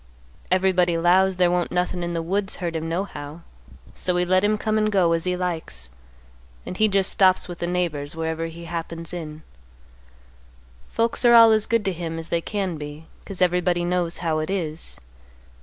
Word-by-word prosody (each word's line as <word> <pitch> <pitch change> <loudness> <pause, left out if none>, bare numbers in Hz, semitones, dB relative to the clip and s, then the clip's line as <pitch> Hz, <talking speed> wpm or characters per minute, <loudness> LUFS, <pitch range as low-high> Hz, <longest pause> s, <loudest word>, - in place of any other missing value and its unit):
Everybody 185 -2 +2
'lows 185 +3 +3
there 180 -1 +3
won't 175 -1 0
nothin' 180 0 -1
in 175 0 -3
the 165 -1 -2
woods 195 +3 -1
hurt 170 -3 -4
him 160 0 -3
nohow; 165 -3 -5 0.5
so 180 - -1
we 180 0 +1
let 185 +1 +2
him 210 +1 +2
come 215 +1 0
and 215 0 +1
go, 185 -4 +3
as 165 0 0
he 180 0 0
likes; 165 - -4 0.7
and - - -6
he 215 +3 +3
just 195 -2 +2
stops 185 -1 +3
with 175 -1 -8
the 170 - -2
neighbors 170 -5 -2
wherever 160 0 -2
he 170 +1 -9
happens 165 0 -5
in. 155 -3 -7 1.5
Folks 230 +2 0
are 240 -1 +7
all 230 -1 +9
as 215 -1 +2
good 230 -3 +1
to 195 - 0
him 165 -1 -5
as 165 0 -7
they 170 - 0
can 190 -3 -3
be, 150 +1 -8 0.2
'cause 190 -2 -1
everybody 180 -1 +1
knows 175 -1 -1
how 160 -1 +1
it 155 - -3
is. 160 - -3
175 Hz, 190 wpm, -23 LUFS, 165-190 Hz, 1.5 s, all